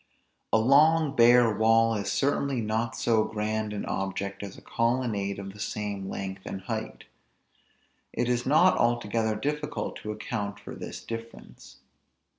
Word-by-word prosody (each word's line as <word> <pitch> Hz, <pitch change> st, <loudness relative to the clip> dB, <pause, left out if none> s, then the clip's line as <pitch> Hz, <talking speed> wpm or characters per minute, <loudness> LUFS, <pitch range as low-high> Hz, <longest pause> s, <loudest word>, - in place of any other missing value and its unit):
A -, -, +5 dB
long 145 Hz, +5 st, +4 dB
bare 120 Hz, -2 st, +6 dB
wall 115 Hz, +1 st, +4 dB
is 100 Hz, -2 st, -2 dB
certainly 140 Hz, -1 st, 0 dB
not 110 Hz, +1 st, -1 dB
so 110 Hz, -2 st, +2 dB
grand 110 Hz, 0 st, -2 dB
an 105 Hz, -, -4 dB
object 95 Hz, +1 st, -3 dB
as 100 Hz, -1 st, -7 dB
a -, -, -13 dB
colonnade 115 Hz, -4 st, -1 dB
of 100 Hz, -1 st, -7 dB
the 105 Hz, -, -14 dB
same 100 Hz, -2 st, -4 dB
length 95 Hz, 0 st, -5 dB
and 95 Hz, -, -5 dB
height. 95 Hz, -, -5 dB, 1.1 s
It 120 Hz, -, -1 dB
is 125 Hz, 0 st, +1 dB
not 155 Hz, +8 st, +4 dB
altogether 115 Hz, -2 st, +1 dB
difficult 150 Hz, +6 st, -3 dB
to 105 Hz, -, -6 dB
account 105 Hz, -2 st, -4 dB
for -, -, -9 dB
this -, -, -8 dB
difference. 115 Hz, -11 st, -9 dB
110 Hz, 145 wpm, -27 LUFS, 100-120 Hz, 1.1 s, bare